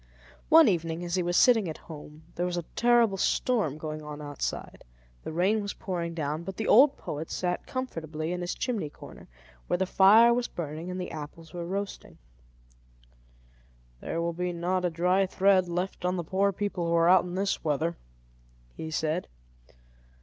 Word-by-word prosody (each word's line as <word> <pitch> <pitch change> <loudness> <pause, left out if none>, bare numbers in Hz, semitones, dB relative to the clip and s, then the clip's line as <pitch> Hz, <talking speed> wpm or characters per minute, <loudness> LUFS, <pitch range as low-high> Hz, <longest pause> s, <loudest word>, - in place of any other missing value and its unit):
One 320 -2 +8
evening, 170 -3 -1
as 170 - -5
he 185 - +2
was 175 0 0
sitting 225 -8 +5
at 155 - -6
home, 150 -1 -12
there 175 +1 -1
was 175 -1 -3
a 175 - -2
terrible 235 -4 +3
storm 195 - 0
going 155 0 -5
on 150 0 -8
outside; 145 -1 -5 0.4
the - - -6
rain 190 +7 +1
was 200 0 -5
pouring 170 -3 -4
down, 155 0 -2
but 190 +2 -7
the 220 - -2
old 270 +5 +6
poet 155 +2 -6
sat 180 -1 -2
comfortably 165 - -4
in 180 0 -3
his 175 - -3
chimney 225 - -2
corner, - - -13 0.4
where - - +1
the 190 - 0
fire 215 +6 +6
was 245 0 0
burning 160 +1 -6
and 180 0 -4
the 180 - -5
apples 155 +2 -9
were 170 -1 -5
roasting. 200 +2 -5 1.8
"There 165 - -4
will 170 0 -1 0.2
not 180 +2 -1
be 180 - +1
a - - -1
dry 180 +3 +2
thread 190 -1 +3
left 180 +2 -3
on 180 +1 0
the 175 - -2
poor 195 +4 +1
people 195 -3 -3
who 170 - +1
are 165 0 +4
out 185 0 +6
in 180 0 -6
this 195 +1 -1
weather," 160 +2 0 0.8
he 160 - -6
said. 160 +2 -1
175 Hz, 180 wpm, -28 LUFS, 160-195 Hz, 1.8 s, One